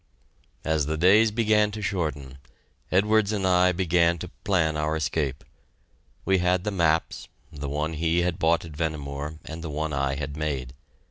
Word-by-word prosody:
As 80 -3 +1
the 80 +1 -1
days 100 +7 +5
began 105 -1 +2
to 110 - -5
shorten, 75 -8 -3 0.5
Edwards 105 +2 +3
and 100 -3 -1
I 90 0 +4
began 85 -1 +2
to - - -8
plan 80 -6 +1
our 75 +1 -1
escape. 75 -3 -2 0.8
We 95 -1 +3
had 90 0 +1
the 105 - -2
maps, 85 -4 0 0.3
the 70 -1 -5
one 75 +3 -2
he 85 +2 +1
had 90 -2 -2
bought 85 +1 +2
at 80 - -10
Vehnemoor 75 -1 -4
and 80 +1 -7
the 80 - -5
one 75 +1 -3
I 70 0 0
had 70 0 -5
made. 70 -5 -3
80 Hz, 170 wpm, -25 LUFS, 75-90 Hz, 0.8 s, days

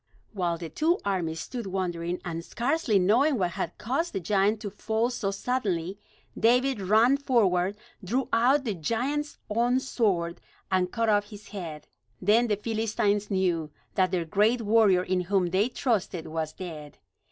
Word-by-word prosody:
While 175 -4 -1
the 165 -1 -6
two 330 - +2
armies 170 -5 -1
stood 240 -5 -6
wondering, 180 -2 -2
and 165 -1 -4
scarcely 245 - 0
knowing 240 +10 +3
what 180 -4 0
had 185 -2 -4
caused 275 +10 -2
the - - -1
giant 200 +4 +1
to 205 - -5
fall 220 +4 -1
so 225 -5 -2
suddenly, 195 -4 -2 0.4
David 250 +1 +2
ran 220 +8 +4
forward, 205 -8 +2 0.3
drew 245 +8 -1
out 260 +5 +4
the 225 -5 -1
giant's 255 - -2
own 240 +4 +2
sword, 190 -10 -1 0.3
and 185 -1 +1
cut 230 -1 0
off 205 -1 +2
his 210 -1 -12
head. 165 -7 -7 0.3
Then 220 +5 +3
the 210 - +1
Philistines 215 -1 0
knew 180 -6 0 0.2
that 185 -1 +2
their 175 -2 -1
great 215 +8 +2
warrior 205 -4 +4
in 185 0 0
whom 180 -1 0
they 200 +6 +2
trusted 205 -10 -1
was 160 -1 -3
dead. 155 -5 -8
205 Hz, 160 wpm, -27 LUFS, 180-235 Hz, 0.4 s, ran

